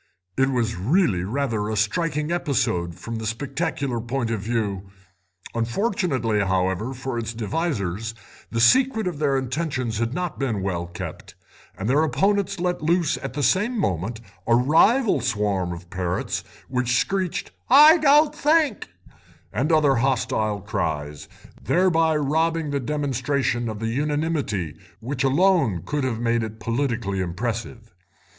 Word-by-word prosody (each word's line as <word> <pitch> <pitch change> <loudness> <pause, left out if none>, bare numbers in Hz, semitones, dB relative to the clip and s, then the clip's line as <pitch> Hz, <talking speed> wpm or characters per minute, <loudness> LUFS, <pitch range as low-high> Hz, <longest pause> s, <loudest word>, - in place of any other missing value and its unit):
It 135 0 +2
was 115 -5 -1
really 110 - +2
rather 110 -1 -1
a 110 - -2
striking 150 - 0
episode 115 - 0
from 115 -1 -6
the 110 -1 -4
spectacular 135 +1 -2
point 120 0 -2
of 110 - -1
view; 100 -3 -2 0.6
unfortunately, 120 - 0
however, 95 +3 0
for 125 -1 -4
its 115 0 -5
devisers, 110 - -2 0.3
the 115 - -2
secret 240 - +4
of 175 -5 -3
their 140 -3 +2
intentions 130 -4 -2
had 115 0 0
not 180 -2 -3
been 115 -8 -1
well 85 -3 -2
kept, 85 0 -8 0.4
and 95 - -3
their 140 +5 +3
opponents 195 +7 +1
let 180 -1 -1
loose 165 0 +2
at 135 -2 -6
the 145 +1 -2
same 210 - +2
moment 100 - -1 0.3
a 115 - +5
rival 165 - +4
swarm 105 -6 0
of 85 0 -8
parrots, 90 -1 -2 0.2
which 125 -1 0
screeched 190 +1 -1 0.2
'I 300 +5 +8
don't 295 0 +5
think' 300 -5 +1 0.6
and 135 - 0
other 150 -4 +4
hostile 110 -5 0
cries, 75 -7 -3 0.3
thereby 165 -3 +2
robbing 160 +1 0
the 140 - 0
demonstration 135 -3 -1
of 110 - -5
the 115 +1 -3
unanimity 145 - -1 0.2
which 125 +2 -3
alone 140 - +3
could 150 -1 -2
have 125 -4 -1
made 115 0 +1
it 110 0 -6
politically 115 -4 -1
impressive. 115 +5 -4
125 Hz, 140 wpm, -23 LUFS, 110-160 Hz, 0.6 s, I